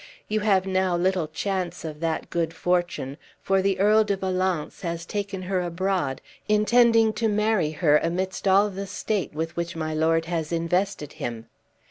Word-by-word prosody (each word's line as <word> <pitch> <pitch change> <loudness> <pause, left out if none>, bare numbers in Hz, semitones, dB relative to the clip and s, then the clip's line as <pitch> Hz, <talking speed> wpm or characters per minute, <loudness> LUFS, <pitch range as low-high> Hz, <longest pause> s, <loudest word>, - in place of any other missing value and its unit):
You 215 +1 0
have 200 -3 +2
now 185 -2 +1
little 180 -2 +1
chance 180 +2 -3
of 155 -2 -6
that 165 -1 -2
good 165 -1 -1
fortune, 175 -6 -1 0.2
for 195 0 +1
Earl 200 +3 +4
de 200 -2 -1
Valence 185 -4 -1
has 170 -1 -4
taken 200 -2 -4
her 185 0 0
abroad, 180 -5 -1 0.3
intending 225 +1 +4
to 225 +1 0
marry 210 -5 +1
her 150 -1 +3
amidst 185 +3 -2
all 200 +2 +4
the 195 +1 -5
state 200 -4 -2
with 160 +1 -3
which 170 0 -3
my 155 -1 -3
lord 160 +1 +2
has 165 -2 -3
invested 170 -1 -1
him." 115 -1 -5
185 Hz, 160 wpm, -25 LUFS, 165-200 Hz, 0.3 s, Earl